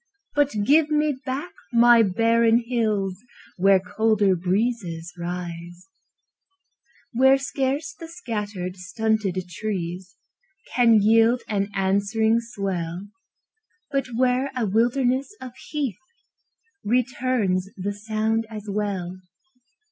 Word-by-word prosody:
But 290 -1 +2
give 305 +4 +4
me 300 -1 +1
back 275 +7 -3 0.2
my 240 0 +6
barren 225 +3 +3
hills 210 -6 -1 0.4
Where 195 +1 +5
colder 205 0 +2
breezes 180 -2 -2
rise; 175 0 -7 1.2
Where 265 +2 +5
scarce 275 +3 -2
the 330 - -10
scattered, 210 - -5
stunted 200 +1 -1
trees 180 -1 -5 0.6
Can 230 -4 +5
yield 225 +3 +4
an 200 -1 -1
answering 200 +4 +2
swell, 195 -5 -4 0.8
But 275 -2 0
where 255 +2 +2
a 240 - +1
wilderness 250 - +1
of 255 - -8 0.2
heath 275 - -3 0.8
Returns 235 -5 0
the 200 +2 -3
sound 220 +2 -1
as 215 -2 -8
well. 195 -3 -3
220 Hz, 100 wpm, -24 LUFS, 190-250 Hz, 1.2 s, my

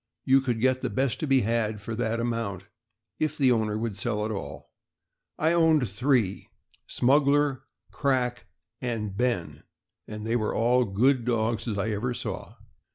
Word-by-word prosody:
You 135 +1 +5
could 120 -3 -1
get 130 +2 +2
the - - -1
best 130 -1 -1
to 155 - -2
be 135 -2 +4
had 110 -1 0
for 110 +3 -6
that 115 0 -1
amount, 115 -6 -3 0.5
if 155 0 -1
the 135 -3 +4
owner 110 -3 +1
would 110 -3 -3
sell 105 0 -1
at 110 - -3
all. 95 -10 -7 0.7
I 160 +2 +2
owned 160 -6 +4
three 110 -1 0 0.2
— - - -35
Smuggler, 140 +1 +3 0.3
Crack, 125 -3 -1 0.3
and 110 -5 -3
Ben— 120 -6 -1 0.5
and 105 0 -7
they 115 +1 0
were 110 -3 -1
all 120 0 +2
as 95 - -9
good 130 +3 +3
dogs 115 -1 -1
as 105 -3 -2
I 110 +2 -1
ever 120 +4 -2
saw. - - -6
120 Hz, 170 wpm, -27 LUFS, 110-130 Hz, 0.7 s, You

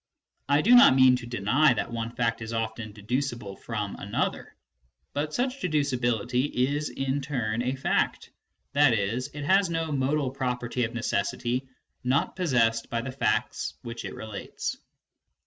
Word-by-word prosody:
I 145 +1 +4
do 240 - +6
not 245 - +9
mean 130 -1 +7
to 120 -1 -8
deny 120 +6 +3
that 120 - -3
one 115 -1 -2
fact 115 -1 -1
is 110 0 -5
often 110 -1 -3
dedu 110 +5 -2
cible 120 -8 -5
from 105 -3 -3
another; 100 - -3 0.6
but 150 +1 -2
such 255 - -1
deducibility 125 - 0
is 145 +4 0
in 135 +1 -2
turn 120 -5 -2
a 125 +2 -1
fact, 135 - 0 0.4
i.e. 140 -4 +5
it 125 +9 -3
has 190 +3 +4
no 165 -1 -2
modal 140 0 0
property 125 -2 -1
of 115 - -7
necessity 120 +3 -1 0.3
not 130 +2 +1
possessed 120 -10 +1
by 115 - -1
the 130 +2 -5
facts 130 - -1
which 115 -1 -6
it - - -6
relates. 110 -2 -5
125 Hz, 150 wpm, -27 LUFS, 115-145 Hz, 0.6 s, not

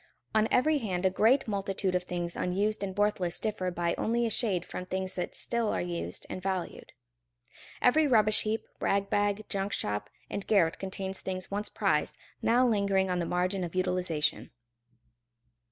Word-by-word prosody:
On 220 0 +4
every 300 +4 +3
hand 190 -6 -2
a 190 - +4
great 235 +8 +3
multitude 195 -2 -1
of 180 0 0
things 175 -1 -3
unused 200 +4 0
and 195 -1 -4
worthless 205 -4 +1
differ 210 -4 -1
by 175 -1 -1
only 235 +1 +1
a 225 - -1
shade 190 -8 0
from 180 - -6
things 190 0 -2
that 180 - -4
still 235 -2 -1
are - - 0
used 175 -1 -3
and 185 - -6
valued. 185 -2 -4 0.9
Every 300 +5 +5
rubbish 215 -4 +5
heap, 220 +1 -2
rag 200 0 0
bag, 205 +1 +1
junk 195 +1 -2
shop, 105 0 -2 0.2
and 200 - -5
garret 180 -6 +3
contains 190 0 -4
things 185 -1 -5
once 205 +1 -2
prized, 150 -8 0 0.2
now 245 +2 +4
lingering 200 -4 +2
on 180 - 0
the 170 - -1
margin 180 +2 0
of 175 0 -5
utilization. 180 -5 0
195 Hz, 170 wpm, -30 LUFS, 180-215 Hz, 0.9 s, Every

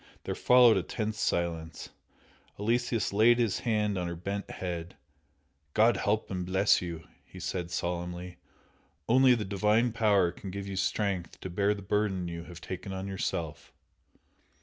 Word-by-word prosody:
There - - -3
followed 125 -2 +6
a - - +2
tense 110 -2 -4
silence 85 -3 -2 0.7
Aloysius 115 0 0
laid 115 +3 +5
his 115 -6 +1
hand 105 -4 0
on 90 - -2
her 85 - -4
bent 100 +4 -4
head 85 -1 -5 0.8
"God 110 +1 +5
help 105 +2 -1
and 90 -1 -2
bless 95 +3 +3
you!" 85 -3 -6 0.2
he - - -13
said, 90 -2 -3
solemnly 90 0 -4 0.7
"Only 130 +1 +6
the 110 -3 -3
Divine 105 +5 +2
Power 105 -6 +3
can 95 +2 -9
give 100 +1 -5
you 100 - -5
strength 95 -2 -1
to 95 - -6
bear 100 +3 +1
the 100 - -9
burden 95 -2 0
you 85 0 -6
have 85 -1 -11
taken 95 +1 -6
on 95 0 -4
yourself!" 85 -5 -4
95 Hz, 155 wpm, -29 LUFS, 90-105 Hz, 0.8 s, followed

